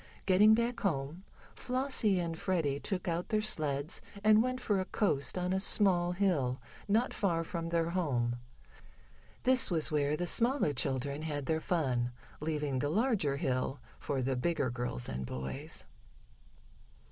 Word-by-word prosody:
Getting 205 +3 +6
back 235 +1 -1
home, 160 +1 -2 0.3
Flossie 250 -6 +1
and 165 -1 -2
Freddie 160 -6 -1
took 185 +1 -3
out 170 +1 -2
their 215 - +2
sleds 155 -7 -1 0.2
and 215 0 +6
went 255 +1 -1
for 205 -5 0
a 185 - -1
coast 185 -7 0
on 180 +1 0
a 190 - +1
small 185 -3 +2
hill, 160 -10 +1 0.3
not 225 +5 +2
far 170 -5 0
from 165 0 -4
their 170 0 0
home. 125 -10 0 1.1
This 255 -1 +5
was 160 -4 0
where 150 0 +1
the 175 - -1
smaller 235 - +2
children 140 +3 -1
had 145 -3 -3
their 160 +3 0
fun, 130 -9 0 0.3
leaving 150 -3 -1
the 145 - 0
larger 200 - +1
hill 135 -2 -1 0.2
for 135 -2 -2
the 135 +1 0
bigger 130 -1 0
girls 120 - -3
and 65 +1 -4
boys. 70 - -4
165 Hz, 150 wpm, -32 LUFS, 140-195 Hz, 1.1 s, Getting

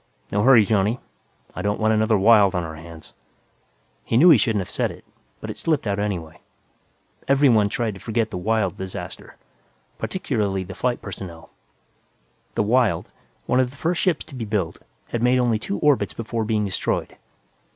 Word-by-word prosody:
"No 100 - +1
hurry, 120 -3 +6
Johnny. 105 +3 +1 0.6
I 90 - -4
don't 105 +2 -1
want 110 0 +2
another 110 0 +3
Wyld 100 -2 +5
on 90 - 0
our 80 -1 -6
hands." 80 0 -12 0.9
He 115 - 0
knew 170 +7 +8
he 150 - +8
shouldn't 105 -1 +1
have 90 - -7
said - - 0
it, - - -12 0.3
but - - -6
it - - -9
slipped 155 -6 0
out 100 -1 -1
anyway. 90 -6 -4 0.9
Everyone 130 -7 +4
tried 115 0 -2
to 95 - -11
forget 115 -1 -1
the - - -4
Wyld 110 +2 0
disaster, 95 -1 -7 0.6
particularly 105 - -2
the 95 +1 -8
flight 125 +3 -2
personnel. 90 -5 -8 1.0
The - - +2
Wyld, 120 +1 +1 0.3
one 125 - +2
of 130 -1 +2
the 140 - -16
first 170 +4 0
ships 180 -5 +1
to - - -15
be 125 -3 -5
built, 100 -6 -2 0.3
had 120 - -2
made 125 +1 +3
only 120 -3 +2
two 100 - -3
orbits 145 +3 +2
before 115 0 -3
being 105 -1 0
destroyed. 95 - -2
110 Hz, 175 wpm, -23 LUFS, 100-125 Hz, 1.0 s, knew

